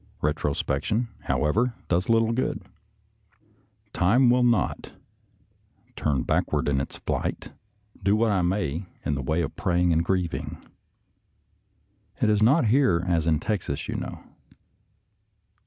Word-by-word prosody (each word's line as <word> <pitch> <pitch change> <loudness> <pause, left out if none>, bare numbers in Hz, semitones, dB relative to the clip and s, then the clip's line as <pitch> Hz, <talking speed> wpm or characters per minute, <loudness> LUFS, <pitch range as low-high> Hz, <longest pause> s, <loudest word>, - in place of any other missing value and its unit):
Retrospection, 75 - -1 0.2
however, 110 +11 +1
does 90 +4 0
little 115 0 +3
good. 125 +3 -2 1.3
Time 120 +8 +4
will 125 +1 +3
not 120 -2 +1 0.5
" - - -38
turn 70 -5 0
backward - - 0
in 70 -2 +1
its - - -6
flight," - - -3 0.5
do 100 +2 +3
what 110 0 +2
I 95 -2 +2
may 90 -1 -1 0.2
in 75 - 0
the 70 - -2
way 80 +6 0
of 75 - -5
praying 90 -1 +1
and 80 +1 +2
grieving. 90 -2 -2 1.6
It 105 - +3
is 105 0 +2
not 130 +7 +4
here 105 -9 +3
as 85 -3 +1
in 80 -2 +3
Texas, 90 -8 -3
you - - -3
know. - - -6
90 Hz, 130 wpm, -25 LUFS, 80-115 Hz, 1.6 s, Time